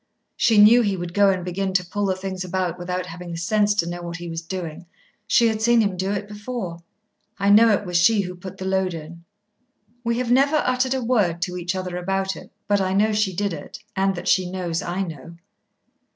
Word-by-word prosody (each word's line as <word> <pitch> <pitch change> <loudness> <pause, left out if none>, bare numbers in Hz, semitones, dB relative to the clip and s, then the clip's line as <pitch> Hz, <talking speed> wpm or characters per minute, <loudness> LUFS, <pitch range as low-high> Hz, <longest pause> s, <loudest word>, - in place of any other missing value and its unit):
She 225 -2 +3
knew 215 +4 +8
he 200 -4 0
would 175 -1 -5
go 200 0 +5
and 185 -2 -1
begin 190 +1 -2
to 180 -1 +1
pull 205 +3 -2
the 190 - +1
things 185 0 -5
about 180 -1 -2
without 180 +1 -3
having 175 +1 -9
the 170 - -5
sense 205 +4 +1
to 170 - +1
know 175 0 -5
what 170 -1 -6
he 175 +1 -7
was 165 0 -4
doing. 170 -1 -6 0.4
She 235 - +4
had 220 -1 -1
seen 235 +1 +4
him 200 -3 0
do 190 +2 -2
it 205 0 -3
before. 205 -4 -6 0.6
I 200 0 +2
know 225 +3 +7
it 205 -1 +1
was 180 -1 0
she 200 +5 +4
who 180 -1 -5
put 180 +1 -10
the 190 - -6
load 190 -2 0
in. 165 +2 -10 0.8
We 235 0 0
have 245 -1 -1
never 275 +4 +4
uttered 255 -2 +1
a 260 - -2
word 205 -9 +1
to 180 0 -3
each 180 +1 -3
other 185 -1 -4
about 195 +1 -1
it, - - -12 0.2
but 205 -1 +2
I 190 0 0
know 215 +2 +2
she 210 -3 0
did 200 0 -1
it, 150 - -8 0.2
and 195 0 +1
that 175 - -6
she 185 -2 +3
knows 180 -3 -2
I 180 +3 -2
know. 165 -1 -8
190 Hz, 230 wpm, -23 LUFS, 175-205 Hz, 0.8 s, knew